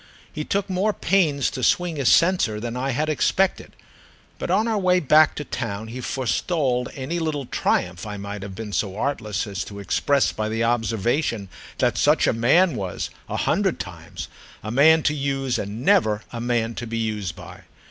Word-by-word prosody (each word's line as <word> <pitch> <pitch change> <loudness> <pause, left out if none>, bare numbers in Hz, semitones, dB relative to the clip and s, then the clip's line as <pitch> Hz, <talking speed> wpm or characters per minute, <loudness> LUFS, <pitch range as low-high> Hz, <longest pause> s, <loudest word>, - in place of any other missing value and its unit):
He 155 - -3
took 200 +4 -1
more 195 +3 0
pains 165 -10 +1
to 130 - -5
swing 175 +4 +1
his 135 -4 +2
censer 165 - +3
than 120 +2 -4
I 130 +2 -2
had 150 +4 0
expected, 185 +5 +1 0.7
but - - -4
on 220 - +2
our 220 -2 +1
way 180 -1 +3
back 155 0 +5
to 150 - -4
town 110 -5 -4
he 125 +3 -6
forestalled 130 0 -1
any 145 +5 -3
little 155 -4 -2
triumph 90 -6 -1
I 105 0 -5
might 100 0 -6
have 95 -1 -7
been 110 -1 -6
so 100 -1 -1
artless 110 -6 -2
as 100 -4 -4
to 100 - -9
express 140 +7 +1
by 110 0 -3
the 115 +1 -1
observation 115 -1 0 0.3
that - - +1
such - - +4
a - - +2
man 140 +8 +3
was—a 95 -5 -5
hundred - - +1
times!—a 110 - -9
man 160 +6 +5
to 150 - +2
use 135 -3 -1
and 105 +4 -5
never 125 - +3
a 115 - -4
man 120 -1 0
to 120 - -5
be 115 0 -3
used 105 -6 -2
by. - - -11
125 Hz, 180 wpm, -23 LUFS, 110-155 Hz, 0.7 s, back